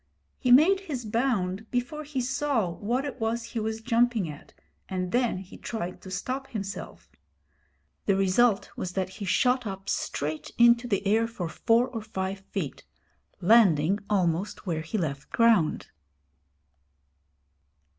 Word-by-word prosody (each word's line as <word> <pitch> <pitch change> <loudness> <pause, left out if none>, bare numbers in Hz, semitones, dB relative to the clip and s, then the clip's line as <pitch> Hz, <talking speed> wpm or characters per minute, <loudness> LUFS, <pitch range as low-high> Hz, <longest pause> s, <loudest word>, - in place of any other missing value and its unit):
He 250 - +1
made 325 +10 +7
his 285 - -5
bound 220 -3 -1
before 250 +5 -2
he 285 -3 -3
saw 250 -6 0
what 240 +10 -2
it 270 -2 -6
was 225 +1 -1
he 235 0 -5
was 220 +1 -3
jumping 230 -4 +2
at, 145 -2 -10 0.4
and 185 -1 -2
then 245 -4 +1
he 190 +2 -10
tried 180 -6 -5
to 190 - -10
stop 260 +8 -3
himself. 200 -3 -7 1.0
The 200 - +4
result 195 +3 +2
was 180 -1 -4
that 185 -1 -1
he 200 +2 -7
shot 250 +5 +2
up 195 -1 -6
straight 150 +2 -2
into 235 +1 +5
the 200 -2 -1
air 220 +3 +3
for 200 -7 -5
four 230 +8 +2
or 240 -3 -5
five 195 -2 -4
feet, 190 -6 -5 0.6
landing 190 -3 +5
almost 185 -1 0
where 165 -4 -1
he 165 +7 -3
left 140 -7 -3
ground. 225 -9 +3
220 Hz, 145 wpm, -27 LUFS, 185-245 Hz, 1.0 s, made